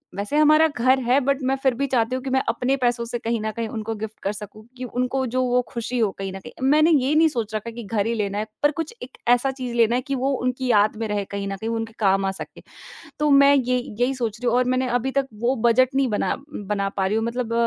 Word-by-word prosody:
वैसे 205 +9 -2
हमारा 305 +1 +6
घर 260 -2 +2
है 250 +3 +4
बट 275 +2 0
मैं 265 +1 +2
फिर 265 -2 +3
भी 280 - +1
चाहती 250 -1 +1
हूँ 255 - -4
कि 270 - -3
मैं 265 0 +2
अपने 260 +2 0
पैसों 240 -2 0
से 240 +1 -3
कहीं 230 0 -1
न 215 0 -2
कहीं 230 -1 -2
उनको 225 0 -4
गिफ्ट 220 0 -7
कर 200 - 0
सकूँ 210 +1 -10
कि 255 - -6
उनको 250 +2 -1
जो 255 - +3
वो 250 0 +2
खुशी 235 +1 -4
हो 215 -3 +3
कहीं 195 -1 -4
न 195 - -6
कहीं। 245 +4 -7
मैंने 310 +3 +5
ये 280 -2 +3
नहीं 320 +1 +6
सोच 230 -7 -4
रखा 225 +2 -4
कि 235 +1 -8
घर 205 -1 -1
ही 230 - 0
लेना 205 -2 -2
है, 215 - -2 0.2
पर 290 - +5
कुछ 325 +7 -5
एक 250 - -11
ऐसा 245 +2 +3
चीज़ 255 -3 -6
लेना 235 0 +3
है 250 - +1
कि 275 - -1
वो 265 +2 0
उनकी 255 +1 -1
याद 210 0 +3
में - - -1
रहे 205 -1 -2
कहीं 200 0 -5
न 195 - -3
कहीं 220 +4 -5
वो 230 - -1
उनके 225 0 -4
काम 195 -1 +2
आ 195 - 0
सके। 190 - -8 0.6
तो 300 0 +2
मैं 280 0 +7
ये 250 -2 +1 0.2
यही 255 +2 +2
सोच 230 -3 -3
रही 245 - -3
हूँ 235 - +1
और 250 - +2
मैंने 255 0 0
अभी 245 +2 0
तक 270 - -2
वो 245 +3 +2
बजट 255 +3 +3
नहीं 270 -1 +3
बना 210 - 0 0.2
बना 200 -1 -2
पा 190 - +1
रही 210 - 0
हूँ 225 - 0
मतलब 235 0 -3
245 Hz, 280 wpm, -23 LUFS, 220-265 Hz, 0.6 s, मैं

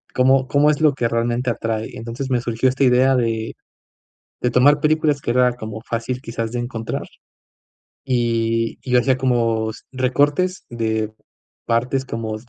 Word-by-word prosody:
¿Cómo 130 0 +3
cómo 145 +2 +3
es 150 - -2
lo 150 -3 +5
que 120 -3 0
realmente 120 +2 -1
atrae? 110 -1 -3
Entonces 115 +4 -5
me 120 -1 +2
surgió 120 +2 +1
esta 135 +2 0
idea 130 +1 +4
de 115 -2 -1 0.9
de 125 - +1
tomar 145 +4 +4
películas 155 -2 +2
que 120 - -3
era 125 0 +3
como 110 -2 -7
fácil 120 +2 -3
quizás 115 0 -4
de 120 - -2
encontrar. 115 -2 -4 1.0
Y 115 -2 0
y 125 -1 0
hacía 130 +1 +3
como 115 -4 +1
s - - -12
recortes 145 +8 +1
de 110 -2 -2 0.5
partes 125 +3 0
como 110 -3 -4
120 Hz, 155 wpm, -20 LUFS, 115-130 Hz, 1.0 s, lo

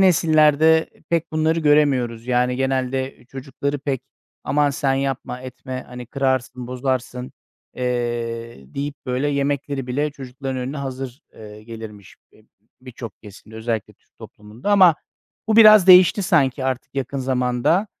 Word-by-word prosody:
nesillerde 160 -3 +4 0.2
pek 165 -1 -1
bunları 160 +1 +1
göremiyoruz. 135 -6 +2
Yani, 125 0 +1
genelde 130 -1 -2
çocukları 135 +2 -5
pek, 135 -2 -3 0.4
"Aman, 145 0 +2
sen 135 -1 0
yapma, 135 -2 -3
etme, 130 0 -7
hani, 125 0 -9
kırarsın, 130 -1 -2
bozarsın." 125 0 -3 0.4
eee, 120 - -3 0.2
deyip 145 +1 -3
böyle 130 +3 -1
yemekleri 140 -1 -2
bile 145 +4 -1
çocukların 135 -1 -7
önüne 130 +3 -4
hazır, 135 -1 -6
eee, 105 0 -12
gelirmiş 110 -3 -10 0.2
b - - -22 0.4
birçok 125 -3 -10
kesimde, 110 +1 -13
özellikle 110 -1 -3
Türk - - -42
toplumunda. 110 - -7
Ama 185 -5 +6 0.5
bu 220 - +2
biraz 215 -4 +8
değişti 185 +2 +7
sanki 135 -5 +1
artık 130 +1 -3
yakın 135 0 -3
zamanda. 130 - +1
130 Hz, 130 wpm, -21 LUFS, 125-145 Hz, 0.5 s, biraz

